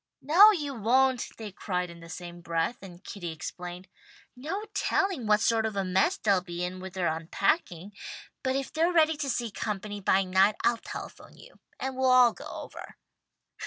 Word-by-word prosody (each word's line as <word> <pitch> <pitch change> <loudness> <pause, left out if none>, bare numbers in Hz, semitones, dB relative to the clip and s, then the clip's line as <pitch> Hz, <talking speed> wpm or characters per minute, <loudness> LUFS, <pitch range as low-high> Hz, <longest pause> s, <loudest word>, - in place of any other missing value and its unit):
"No 355 +9 +8
you 300 -9 -1
won't," 255 +2 +2
they 220 -2 -7
cried 180 -2 -3
in 170 - -13
the 165 0 -12
same 175 0 -8
breath, 165 +6 -1
and 185 -1 -12
Kitty 175 -5 -6
explained, 175 +3 -7 0.5
"No 330 +12 -4
telling 390 - 0
what 210 0 +4
sort 225 -1 +2
of 220 -2 -2
a 195 -1 0
mess 190 - +2
they'll 200 -3 +2
be 175 -1 -5
in 180 +1 -4
with 190 0 -8
their 185 -2 -1
unpacking. 175 - -1 0.5
But 260 -1 0
if 275 0 -3
they're 330 +3 +2
ready 320 -2 +4
to 280 -2 -2
see 235 -2 -2
company 205 0 -4
by 195 0 +3
night, 190 +3 +3
I'll 235 - +3
telephone - - -9
to - - -19
you, - - -17 0.2
and 265 0 -3
we'll 260 0 +2
all 250 -2 +6
go - - -10
over." - - -9
210 Hz, 190 wpm, -28 LUFS, 180-265 Hz, 0.5 s, No